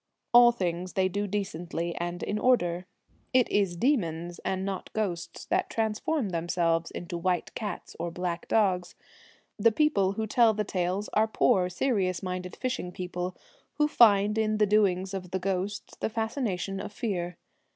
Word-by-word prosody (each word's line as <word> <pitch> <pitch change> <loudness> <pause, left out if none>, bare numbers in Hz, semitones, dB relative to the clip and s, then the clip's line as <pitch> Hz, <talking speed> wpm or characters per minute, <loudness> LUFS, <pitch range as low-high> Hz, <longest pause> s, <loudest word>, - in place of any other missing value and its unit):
All 240 0 +9
things 180 -4 -3
they 190 -1 +2
do 205 +2 -2
decently 175 -4 -3
and 175 +1 -3
in 210 - -1
order. 180 -8 +2 0.5
It 255 -2 +5
is 195 -4 +2
demons, 175 - 0
and 190 0 -2
not 195 -2 -4
ghosts, 185 -6 -3
that - - 0
transform 225 +3 -1
themselves 170 -1 0
into 175 0 -5
white 180 0 -1
cats 205 -5 -5
or 170 +1 -2
black 175 0 -4
dogs. 185 -5 +1 0.6
The 230 +3 +5
people 210 -8 +2
who 220 +2 -2
tell 225 0 +4
the 210 - 0
tales 185 +1 -1
are 220 +1 +3
poor, 185 -4 +2
serious 185 -3 0
minded 180 -1 -4
fishing 255 -8 -3
people, 180 0 -4 0.4
who 300 -1 +3
find 210 -5 +5
in 215 -1 +1
the 210 - +4
doings 195 -2 +2
of 185 -2 -5
the 190 - -1
ghosts 195 +2 -3
the - - -1
fascination 220 -4 -2
of - - -6
fear. 180 -6 -3
190 Hz, 160 wpm, -28 LUFS, 180-215 Hz, 0.6 s, All